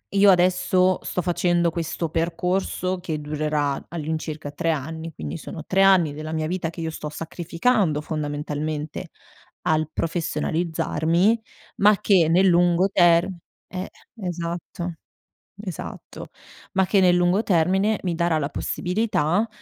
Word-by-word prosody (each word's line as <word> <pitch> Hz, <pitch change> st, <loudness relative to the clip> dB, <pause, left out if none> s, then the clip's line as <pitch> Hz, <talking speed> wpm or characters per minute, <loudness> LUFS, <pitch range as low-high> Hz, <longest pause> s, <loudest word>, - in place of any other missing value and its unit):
io 200 Hz, 0 st, +6 dB
adesso 185 Hz, 0 st, +3 dB
sto 180 Hz, -, -2 dB
facendo 175 Hz, -1 st, +1 dB
questo 165 Hz, 0 st, -3 dB
percorso 180 Hz, +3 st, -1 dB
che 160 Hz, -4 st, -4 dB
durerà 150 Hz, -1 st, -1 dB
all'incirca 155 Hz, -2 st, -4 dB
3 155 Hz, +3 st, -2 dB
anni. 160 Hz, +2 st, -4 dB
Quindi 75 Hz, -, -5 dB
sono -, -, -8 dB
3 190 Hz, +1 st, +2 dB
anni 185 Hz, -6 st, +5 dB
della 155 Hz, +1 st, -6 dB
mia 160 Hz, -1 st, -1 dB
vita 175 Hz, -1 st, -2 dB
che 165 Hz, +1 st, -8 dB
io 160 Hz, 0 st, -2 dB
sto 155 Hz, -1 st, -6 dB
sacrificando, 170 Hz, +3 st, 0 dB
fondamentalmente 150 Hz, 0 st, -4 dB, 0.5 s
al 155 Hz, -1 st, +1 dB
professionalizzarmi, 165 Hz, +4 st, 0 dB, 0.4 s
ma 205 Hz, -1 st, +5 dB
che 185 Hz, -6 st, +4 dB
nel 180 Hz, +4 st, +4 dB
lungo 175 Hz, +1 st, +4 dB
term 175 Hz, 0 st, +4 dB, 0.3 s
eh 185 Hz, 0 st, -5 dB, 0.3 s
esatto. 175 Hz, -1 st, -4 dB, 0.7 s
Esatto, 185 Hz, -6 st, -8 dB, 0.4 s
ma 190 Hz, -1 st, +2 dB
che 200 Hz, -, +3 dB
nel 180 Hz, -2 st, +5 dB
lungo 175 Hz, +4 st, +2 dB
termine 190 Hz, +4 st, +2 dB
mi 175 Hz, -3 st, -1 dB
darà 170 Hz, -1 st, +1 dB
la 140 Hz, -1 st, -2 dB
possibilità 180 Hz, +2 st, 0 dB
170 Hz, 130 wpm, -23 LUFS, 155-185 Hz, 0.7 s, io